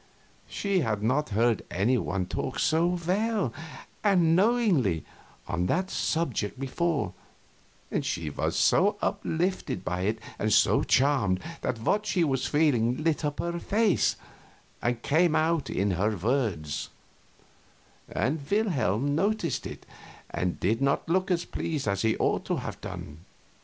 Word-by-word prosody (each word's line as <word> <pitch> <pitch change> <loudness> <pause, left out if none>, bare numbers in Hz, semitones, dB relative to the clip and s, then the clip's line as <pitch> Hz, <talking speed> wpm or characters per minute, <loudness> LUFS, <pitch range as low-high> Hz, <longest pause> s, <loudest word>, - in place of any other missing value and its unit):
She 200 -2 0
had 105 - -1
not 135 +7 +1
heard 115 +1 +2
any 100 +9 +2
one 95 -5 -1
talk - - -4
so 170 +3 +2
well 200 - 0 0.5
and 200 -3 +4
so - - +4
knowingly 175 - +3 0.4
on 85 +1 -1
that 185 - 0
subject 130 -9 -1
before, 135 - -1 0.8
and - - 0
she 80 -3 -2
was - - -2
so 205 +3 +3
uplifted 180 - -1
by 90 0 -2
it 110 +2 0 0.2
and 110 - 0
so - - +4
charmed 130 -10 +2 0.2
that 115 -3 -2
what 210 - +1
she 180 - +2
was 135 -4 0
feeling 140 -3 +2
lit 160 -1 +1
up 145 -1 -1
her 170 0 -2
face 210 0 +2 0.7
and 120 -1 -1
came 160 +2 +3
out 160 -1 +1
in 100 +1 0
her 105 +4 0
words; 100 - -1 1.2
and 140 +8 0
Wilhelm 145 - +1
noticed 190 - 0
it - - -10 0.5
and 90 -1 -2
did 110 +7 +1
not 140 0 +1
look 185 +3 +1
as 175 -2 +1
pleased 150 -7 -3
as 100 -1 0
he 110 -1 +1
ought - - +1
to - - 0
have - - -6
done. 85 -4 -7
140 Hz, 145 wpm, -27 LUFS, 105-175 Hz, 1.2 s, and